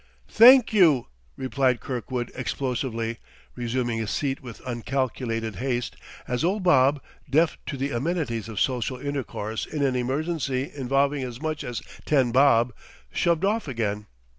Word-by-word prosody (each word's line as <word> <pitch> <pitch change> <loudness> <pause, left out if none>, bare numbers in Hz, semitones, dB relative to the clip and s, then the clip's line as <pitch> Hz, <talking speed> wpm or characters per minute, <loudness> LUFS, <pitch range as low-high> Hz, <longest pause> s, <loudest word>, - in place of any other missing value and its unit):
"Thank 245 +1 +7
you!" 160 - +5 0.3
replied 130 -1 +1
Kirkwood 125 -1 -4
explosively, 120 -3 -3 0.4
resuming 120 -1 -1
his 110 -1 -2
seat 135 +1 -2
with 120 -4 -10
uncalculated 120 -3 -2
haste 125 -1 -2 0.3
as 125 +2 -1
old 190 +3 0
Bob, 140 -4 +4 0.3
deaf 155 +4 +3
to 140 - -4
the 135 +2 -2
amenities 120 - -2
of 110 -4 -4
social 130 0 0
intercourse 125 -6 -4
in 150 -2 -2
an 135 -2 +1
emergency 135 +1 -1
involving 140 +1 +1
as 125 -2 -5
much 155 0 -3
as 120 -2 -5 0.2
ten 135 -5 +2
bob, 125 -2 +4 0.4
shoved 170 +1 +1
off 215 -2 0
again. 105 -5 -2
130 Hz, 140 wpm, -25 LUFS, 120-145 Hz, 0.4 s, Thank